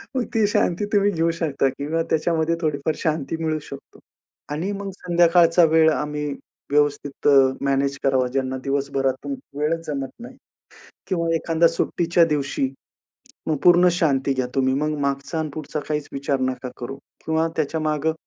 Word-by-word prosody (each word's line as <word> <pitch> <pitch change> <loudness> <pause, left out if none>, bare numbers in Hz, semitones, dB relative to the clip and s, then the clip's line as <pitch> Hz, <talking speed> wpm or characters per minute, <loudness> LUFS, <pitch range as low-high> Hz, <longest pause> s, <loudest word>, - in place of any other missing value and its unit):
मग 250 -2 0
ती 220 -2 +3
शांती 200 -1 +1
तुम्ही 205 0 +4
घेऊ 165 -2 +1
शकता 140 -4 +1
किंवा 160 +4 -1
त्याच्यामध्ये 160 +1 +1
थोडीफार 155 -1 -1
शांती 155 0 -1
मिळू 155 -1 0
शकतो 140 - -11 0.5
आणि 170 +7 -2
मग 200 0 -5
संध्याकाळचा 175 0 +4
वेळ 160 0 +5
आम्ही 150 -1 -2 0.4
व्यवस्थित 145 -1 0
अ, 135 -2 +6
मॅनेज 140 0 +1
करावा, 130 -2 +2
ज्यांना 130 -1 -1
दिवसभरातून 135 - -1 0.3
वेळच 165 +2 -1
जमत 140 -3 -3
नाही 250 +2 -10 0.7
किंवा 170 -3 0
एखादा 165 0 +3
सुट्टीच्या 170 0 +2
दिवशी, 140 -2 -1 0.8
मग 155 -2 +1
पूर्ण 175 0 +7
शांती 140 -6 +1
घ्या 130 -1 -1
तुम्ही. 130 -1 +2
मग 150 +2 0
मागचा 140 +3 -2
आणि 160 -1 -1
पुढचा 155 -1 -4
काहीच 150 -1 -2
विचार 140 0 -1
नका 130 0 -2
करू 125 +3 -6 0.3
किंवा 160 +1 +1
त्याच्यामागे 155 0 0
155 Hz, 150 wpm, -22 LUFS, 140-165 Hz, 0.8 s, पूर्ण